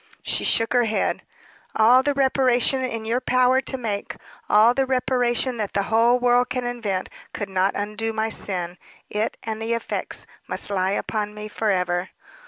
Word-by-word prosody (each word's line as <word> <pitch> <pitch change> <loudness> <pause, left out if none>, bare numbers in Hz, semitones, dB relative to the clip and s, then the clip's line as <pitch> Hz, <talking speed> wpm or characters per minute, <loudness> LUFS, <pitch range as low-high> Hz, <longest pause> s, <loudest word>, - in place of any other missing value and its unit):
She - - -1
shook 225 +1 +2
her 245 -1 +3
head. 220 -1 -1 0.5
"All 240 +4 +6
the 285 +1 0
reparation 265 -1 +2
in 230 -3 -3
your 235 +3 0
power 255 +1 +3
to 265 - -3
make 215 -5 -4 0.3
all 220 +3 +6
the 265 +1 0
reparation 250 -1 0
that 210 -3 -3
the 200 - +1
whole 235 +2 +5
world 245 0 +2
can 255 -1 -2
invent 230 -6 -3 0.3
could 205 -2 -4
not 190 +1 +1
undo 210 +2 -3
my 220 0 -1
sin. 180 -4 -3 0.3
It 210 +2 -2
and 220 -1 -4
the 225 +1 -1
effects 230 - -4 0.2
must - - 0
lie 190 0 +1
upon 210 -1 -3
me 210 0 -6
forever." 180 -4 -1
225 Hz, 170 wpm, -23 LUFS, 210-250 Hz, 0.5 s, All